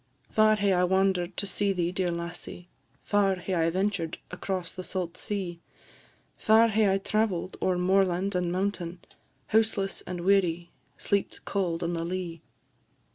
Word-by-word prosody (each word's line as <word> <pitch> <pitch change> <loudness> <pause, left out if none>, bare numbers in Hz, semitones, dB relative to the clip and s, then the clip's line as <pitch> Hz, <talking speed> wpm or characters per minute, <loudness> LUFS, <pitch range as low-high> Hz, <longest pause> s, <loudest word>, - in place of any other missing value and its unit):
"Far 215 0 +5
hae 200 -2 +2
I 180 0 +3
wander'd 190 -1 +1
to - - +1
see 200 0 0
thee, 175 -2 0
dear 185 -1 0
lassie! 170 +1 -6 0.4
Far 200 -2 +2
hae 185 +1 -4
I 165 -2 +2
ventured 185 -2 -1
across 180 -1 -3
the 185 - -6
saut 180 -2 -4
sea; 185 -5 -4 0.8
Far 225 +1 +5
hae 215 -2 +3
I 195 - +3
travell'd 195 -3 -1
ower 185 -1 +2
moorland 190 +1 +2
and 180 -1 0
mountain, 180 -2 -2 0.5
Houseless 215 -3 +1
and 175 -1 -4
weary, 175 -3 +2 0.3
sleep'd 200 -1 -1
cauld 175 -4 -1
on 170 +1 -1
the 165 -1 -2
lea. 170 -2 -4
185 Hz, 150 wpm, -28 LUFS, 175-200 Hz, 0.8 s, Far